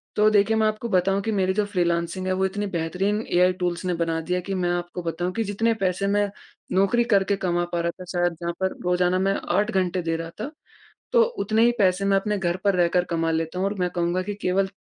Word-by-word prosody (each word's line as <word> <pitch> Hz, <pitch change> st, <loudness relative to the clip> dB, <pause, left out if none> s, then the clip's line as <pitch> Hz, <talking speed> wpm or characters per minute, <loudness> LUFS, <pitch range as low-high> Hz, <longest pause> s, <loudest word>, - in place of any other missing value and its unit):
तो 210 Hz, 0 st, +5 dB
देखिए 210 Hz, +1 st, +3 dB
मैं 220 Hz, 0 st, +3 dB
आपको 215 Hz, +2 st, -3 dB
बताऊँ, 195 Hz, +1 st, +2 dB
कि 220 Hz, -, -2 dB
मेरी 190 Hz, -2 st, +1 dB
जो 210 Hz, +1 st, +1 dB
फ्रीलांसिंग 175 Hz, -1 st, -1 dB
है, 185 Hz, -, +1 dB
वो 190 Hz, +1 st, +1 dB
इतने 205 Hz, +2 st, -2 dB
बेहतरीन 185 Hz, +5 st, -1 dB
एआई 180 Hz, +1 st, +4 dB
टूल्स 175 Hz, +1 st, -1 dB
ने 180 Hz, -, 0 dB
बना 165 Hz, -1 st, -1 dB
दी 180 Hz, +3 st, -3 dB
है 180 Hz, -, 0 dB
कि 195 Hz, +2 st, -5 dB
मैं 175 Hz, -1 st, 0 dB
आपको 175 Hz, 0 st, -3 dB
बताऊँ 175 Hz, +2 st, -2 dB
कि 225 Hz, -, -1 dB
जितने 220 Hz, +3 st, 0 dB
पैसे 185 Hz, +2 st, 0 dB
मैं 205 Hz, 0 st, +1 dB, 0.4 s
नौकरी 200 Hz, +6 st, +3 dB
करके 200 Hz, 0 st, +3 dB
कमा 175 Hz, 0 st, +1 dB
पा 170 Hz, -, +1 dB
रहा 170 Hz, 0 st, 0 dB
था, -, -, -7 dB
शायद 175 Hz, -1 st, +1 dB
जहाँ 170 Hz, 0 st, -2 dB
पर 190 Hz, -, 0 dB
रोज़ाना 180 Hz, +1 st, +2 dB
मैं 195 Hz, +1 st, +2 dB, 0.2 s
8 210 Hz, +3 st, +1 dB
घंटे 185 Hz, -2 st, 0 dB
दे 165 Hz, -1 st, -1 dB
रहा 165 Hz, 0 st, -5 dB
था। 285 Hz, -, -4 dB, 0.6 s
तो 475 Hz, -1 st, +6 dB, 0.2 s
उतने 220 Hz, +3 st, +3 dB
ही 240 Hz, -, +4 dB
पैसे 190 Hz, 0 st, +2 dB
मैं 195 Hz, 0 st, +3 dB
अपने 205 Hz, +1 st, 0 dB
घर 175 Hz, -1 st, 0 dB
पर 200 Hz, -1 st, +3 dB
रहकर 175 Hz, 0 st, +2 dB
कमा 165 Hz, 0 st, 0 dB
लेता 160 Hz, +2 st, -2 dB
हूँ 190 Hz, -, +1 dB
और 200 Hz, -, -1 dB
मैं 180 Hz, 0 st, +1 dB
कहूँगा 175 Hz, +1 st, 0 dB
कि 205 Hz, +2 st, -4 dB
केवल 190 Hz, +1 st, +1 dB
185 Hz, 245 wpm, -24 LUFS, 175-200 Hz, 0.6 s, तो